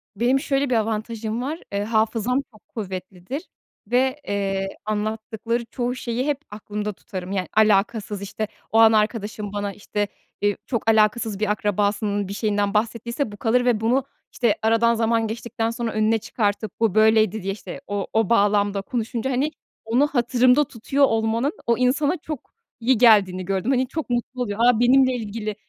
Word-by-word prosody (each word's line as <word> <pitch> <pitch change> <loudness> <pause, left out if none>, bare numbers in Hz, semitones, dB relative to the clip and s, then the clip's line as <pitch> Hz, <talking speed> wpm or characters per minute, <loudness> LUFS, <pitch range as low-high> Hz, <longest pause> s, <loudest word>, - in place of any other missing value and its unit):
Benim 245 +6 +2
şöyle 275 0 0
bir 250 - +2
avantajım 220 +1 -2
var, 300 +6 -3
ııı, 200 0 0
hafızam 225 +3 +1
çok 215 - -21
kuvvetlidir 190 - -6 0.4
ve, 260 +4 +1
eee, 195 -1 -1 0.2
anlattıkları 220 +2 -2
çoğu 245 +1 -3
şeyi 245 0 -2
hep 290 -2 0
aklımda 210 0 -4
tutarım. 185 -2 -7
Yani, 190 -2 -1
alakasız, 210 -1 +2
işte, 210 +2 -4 0.2
o 225 - +2
an 225 -1 +8
arkadaşım 210 -1 -1
bana, 205 -1 -3
işte, 205 0 -3 0.3
iii, 205 0 +1
çok 230 -3 -1
alakasız 215 -1 +2
bir 215 -1 +1
akrabasının 205 0 0
bir 195 - -5
şeyinden 205 -1 0
bahsettiyse 230 +3 -1
bu 205 - -10
kalır 245 +3 +2
ve 240 -4 +3
bunu, 250 +4 +2 0.3
işte, 235 -4 +1
aradan 230 +1 +3
zaman 225 0 +1
geçtikten 225 0 -3
sonra 230 0 -3
önüne 215 +1 +2
çıkartıp 215 -2 -2
"Bu 220 -4 +1
böyleydi." 220 -1 +4
diye, 195 +1 -1
işte, 215 +6 -9
o 205 -1 -2
o 220 -3 +2
bağlamda 205 -2 +3
konuşunca, 235 +3 -3
hani, 270 +4 0 0.3
onu 245 +6 +3
hatırımda 250 +1 +3
tutuyor 275 +2 +1
olmanın 225 +4 0
o 235 -1 +3
insana 280 +5 +2
çok 305 -5 -7 0.3
iyi 245 +2 +3
geldiğini 200 -6 +5
gördüm. 195 +6 0
Hani, 260 -1 +2
çok 315 +2 -5
mutlu 245 +1 -2
oluyor, 205 -3 -3
"A, 240 -1 +4
benimle 260 +2 +5
ilgili." 215 -2 -4
225 Hz, 165 wpm, -23 LUFS, 205-245 Hz, 0.4 s, an